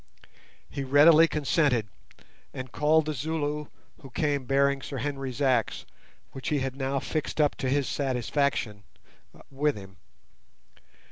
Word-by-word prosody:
He 140 - -5
readily 150 +4 +6
consented, 145 -6 +1 0.7
and 130 -2 -6
called 155 +3 +3
the 155 - -2
Zulu, 150 +1 -3 0.3
who 135 - -11
came 145 0 -1
bearing 140 +1 +2
Sir 135 - -6
Henry's 135 0 -3
axe, 125 -4 +1 0.5
which 135 - -5
he 150 - +1
had 135 -1 -2
now 135 0 -2
fixed 155 +3 -4
up 150 -1 +3
to 130 - -2
his 140 0 +1
satisfaction, 130 -4 -1 0.7
with 145 +2 0
him. 95 -1 -12
140 Hz, 130 wpm, -27 LUFS, 130-150 Hz, 0.7 s, readily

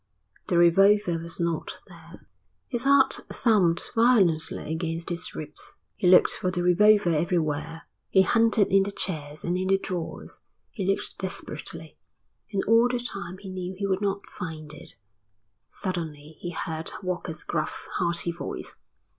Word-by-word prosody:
The 175 - +1
revolver 180 +1 +5
was 165 0 -6
not 170 -2 -2
there. - - -15 0.4
His 245 -1 -2
heart 275 -1 +5
thumped 190 -8 +2
violently 195 -10 +2
against 165 0 -3
his 175 +1 -3
ribs. 150 -1 -4 0.2
He 180 - 0
looked 180 - +7
for 185 - 0
the 175 -1 -2
revolver 205 +1 +5
everywhere. 160 -1 -1 0.3
He 190 - +5
hunted 225 -2 +3
in 195 - +7
the 200 +1 -1
chairs 155 -6 -4
and 175 - 0
in 185 - -1
the 195 0 +4
drawers. 180 -3 -5 0.3
He 195 -5 -4
looked 195 +1 -1
desperately, 190 -1 -7 0.5
and 195 -2 0
all 230 +2 +5
the 245 0 -1
time 200 -6 -6
he 195 0 -10
knew 185 0 -5
he 200 - -2
would 195 0 0
not 200 0 -1
find 155 -5 -7
it. 150 - -6 0.7
Suddenly 160 -5 -5
he 175 - -5
heard 160 -1 -4
Walker's 175 -3 -4
gruff, 155 -2 -3
hearty 170 0 +1
voice. 170 - -6
180 Hz, 150 wpm, -26 LUFS, 165-200 Hz, 0.7 s, looked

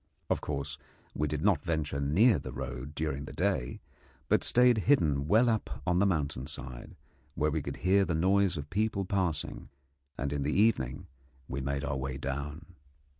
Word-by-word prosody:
Of - - +1
course, 70 0 -4 0.3
we 75 - 0
did - - -3
not - - +3
venture 75 -4 -1
near 90 - +4
the - - -7
road 65 +2 -6
during 75 -3 -2
the - - -9
day, 90 -9 -1 0.5
but - - +4
stayed 125 -2 +4
hidden 75 - +3
well 110 +8 +5
up 110 - -1
on 90 0 +2
the 100 - +4
mountain 70 -7 -1
side, 65 -3 -5 0.4
where 75 +1 +1
we 80 0 -1
could 70 0 -5
hear 100 +2 +5
the 85 -4 -1
noise 95 +2 +3
of 75 0 -7
people 105 0 0
passing, 90 -6 -2 0.5
and 70 +2 -2
in 70 - -2
the 75 +7 +1
evening 70 - +2 0.4
we 70 +2 -3
made 70 +1 -2
our 70 -1 -2
way 65 0 -3
down. 70 +4 -4
75 Hz, 175 wpm, -30 LUFS, 70-95 Hz, 0.5 s, well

